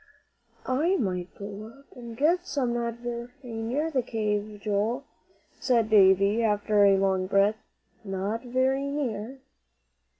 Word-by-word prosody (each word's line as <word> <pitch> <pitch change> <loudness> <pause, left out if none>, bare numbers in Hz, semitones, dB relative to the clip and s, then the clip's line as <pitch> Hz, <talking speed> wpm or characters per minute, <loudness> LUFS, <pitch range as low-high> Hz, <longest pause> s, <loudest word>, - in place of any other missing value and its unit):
"I 310 +9 +1
might 180 - -3
go 200 +1 -7
up 275 - -21
and 235 -2 -9
get 345 +6 +2
some 260 -4 -1
not 235 -1 -2
very 240 0 -6
near 245 +7 -2
the 265 -4 +1
cave, 210 -2 -2
Joel," 215 +6 -1 0.6
said 230 -4 +1
Davie, 200 +1 +5
after 210 -1 +2
a 195 -1 +5
long 190 -1 +1
breath. 200 +3 +2 0.4
"Not 200 +3 -3
very 260 +2 0
near." 265 -3 -4
225 Hz, 130 wpm, -27 LUFS, 205-255 Hz, 0.6 s, Davie